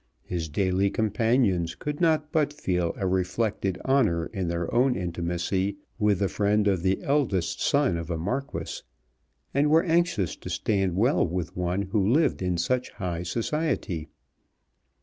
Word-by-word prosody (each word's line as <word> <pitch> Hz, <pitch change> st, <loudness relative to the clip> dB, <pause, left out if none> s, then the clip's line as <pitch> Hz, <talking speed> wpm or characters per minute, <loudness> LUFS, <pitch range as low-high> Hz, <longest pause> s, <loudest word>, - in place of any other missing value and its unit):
His 85 Hz, -3 st, -4 dB
daily 95 Hz, +4 st, +1 dB
companions 105 Hz, -5 st, +1 dB
could 150 Hz, +1 st, -5 dB
not 155 Hz, -2 st, +2 dB
but 150 Hz, -2 st, +2 dB
feel 90 Hz, -, -1 dB
a 95 Hz, -, -2 dB
reflected 95 Hz, +1 st, 0 dB
honour 110 Hz, -12 st, +2 dB
in 95 Hz, -4 st, -2 dB
their 85 Hz, 0 st, -2 dB
own 125 Hz, +1 st, +3 dB
intimacy 90 Hz, +2 st, -2 dB, 0.2 s
with 105 Hz, -2 st, +3 dB
the 100 Hz, +1 st, +1 dB
friend 105 Hz, +1 st, +1 dB
of 95 Hz, -4 st, +2 dB
the 95 Hz, +1 st, 0 dB
eldest 130 Hz, -, 0 dB
son 85 Hz, -, +2 dB
of 85 Hz, 0 st, -6 dB
a 85 Hz, -, -1 dB
Marquis, 125 Hz, +12 st, -3 dB, 0.7 s
and 145 Hz, +2 st, +3 dB
were 160 Hz, +2 st, +5 dB
anxious 170 Hz, -, +1 dB
to -, -, -8 dB
stand 95 Hz, -4 st, 0 dB
well 120 Hz, +5 st, +3 dB
with 85 Hz, 0 st, -4 dB
one 90 Hz, +2 st, -1 dB
who 100 Hz, +1 st, 0 dB
lived 140 Hz, +7 st, +2 dB
in 90 Hz, -1 st, 0 dB
such 125 Hz, +9 st, 0 dB
high 90 Hz, -4 st, -3 dB
society. 115 Hz, -, -2 dB
100 Hz, 150 wpm, -26 LUFS, 90-125 Hz, 0.7 s, were